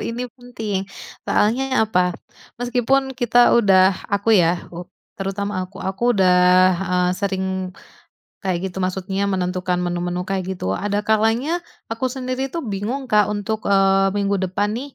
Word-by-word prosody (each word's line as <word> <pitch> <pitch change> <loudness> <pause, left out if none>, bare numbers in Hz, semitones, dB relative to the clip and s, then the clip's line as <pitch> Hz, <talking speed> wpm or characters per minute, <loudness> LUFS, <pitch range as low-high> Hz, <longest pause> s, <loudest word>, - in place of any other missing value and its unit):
ini 240 +2 -3
penting 220 -6 -5 0.4
soalnya 255 +3 +2
apa, 180 -5 0 0.4
meskipun 250 +2 0
kita 245 -1 +3
udah 195 -4 +5 0.2
aku 200 +2 +1
ya 175 -4 +4 0.6
terutama 195 0 -3
aku 190 - -16
aku 215 +5 0
udah, 185 -2 +4 0.5
eee, 180 -1 +1
sering 190 0 -2 0.9
kayak 185 0 -2
gitu, 180 - -8
maksudnya 190 +1 -2
menentukan 180 -1 -1
menu-menu 175 0 -2
kayak 190 0 -3
gitu, 135 - -4
ada 205 0 -1
kalanya 225 +10 +1 0.3
aku 225 +3 -1
sendiri 255 0 -3
tuh 330 +5 -5
bingung, 235 +5 -4
Kak, 210 -1 +4
untuk, 210 +1 -3
eee, 195 0 +3
minggu 200 -1 0
depan 190 +2 -1
nih 255 +6 -6
200 Hz, 135 wpm, -21 LUFS, 190-240 Hz, 0.9 s, udah